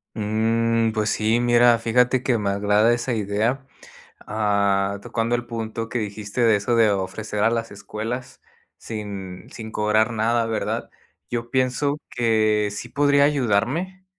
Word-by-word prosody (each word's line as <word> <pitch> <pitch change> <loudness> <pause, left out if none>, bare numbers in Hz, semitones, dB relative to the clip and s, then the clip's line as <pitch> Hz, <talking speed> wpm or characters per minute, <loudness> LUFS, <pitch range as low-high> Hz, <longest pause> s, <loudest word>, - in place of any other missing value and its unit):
Mm, 115 +1 +1
pues 110 -1 -1
sí. 110 +2 +1
Mira, 120 0 +5
fíjate 125 +2 +2
que 125 -2 +1
me 100 -2 -1
agrada 105 +3 +3
esa 120 +1 -2
idea. 110 +5 -1 0.6
Ah, 100 -2 +1
tocando 115 0 -1
el 120 - -3
punto, 115 -1 -5
que 125 - -2
dijiste 105 +2 -4
de 115 -2 +5
eso 105 +4 0
de 110 -2 +5
ofrecer 100 +2 -3
a 115 - +5
las 115 -1 -2
escuelas 110 +5 -6 0.4
sin 100 -4 -7
sin 110 -1 -8
cobrar 110 +2 +2
nada, 115 +1 +1
¿verdad? 115 -1 -3 0.4
Yo 120 -1 -4
pienso 130 +3 0
que 110 -3 +1
sí 105 +4 -6
podría 145 +2 +3
ayudarme, 145 - 0
115 Hz, 145 wpm, -23 LUFS, 105-120 Hz, 0.6 s, Mira